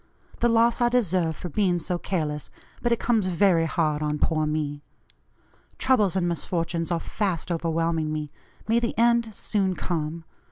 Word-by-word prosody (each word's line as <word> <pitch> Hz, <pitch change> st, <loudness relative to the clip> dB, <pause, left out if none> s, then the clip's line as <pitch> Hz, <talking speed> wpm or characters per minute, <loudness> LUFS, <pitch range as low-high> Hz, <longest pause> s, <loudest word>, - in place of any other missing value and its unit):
The 240 Hz, -, +3 dB
loss 230 Hz, +1 st, +3 dB
I 240 Hz, -, +4 dB
deserve 185 Hz, -9 st, +1 dB
for 180 Hz, -, -6 dB
being 180 Hz, +1 st, +1 dB
so 175 Hz, +1 st, -2 dB
careless, 150 Hz, -6 st, -2 dB, 0.3 s
but 240 Hz, -, 0 dB
it 235 Hz, -, +3 dB
comes 225 Hz, -5 st, +1 dB
very 175 Hz, -2 st, +3 dB
hard 155 Hz, -2 st, 0 dB
on 150 Hz, 0 st, -1 dB
poor 155 Hz, 0 st, +1 dB
me. 150 Hz, -1 st, -2 dB, 1.0 s
Troubles 215 Hz, -8 st, +2 dB
and 180 Hz, -2 st, +1 dB
misfortunes 165 Hz, 0 st, -2 dB
are 170 Hz, -1 st, 0 dB
fast 185 Hz, -3 st, -2 dB
overwhelming 165 Hz, -1 st, 0 dB
me; 150 Hz, -1 st, -4 dB, 0.4 s
may 230 Hz, +1 st, +3 dB
the 235 Hz, -1 st, -2 dB
end 235 Hz, 0 st, +3 dB
soon 195 Hz, -3 st, 0 dB
come. 165 Hz, -1 st, -3 dB
175 Hz, 160 wpm, -25 LUFS, 160-210 Hz, 1.0 s, I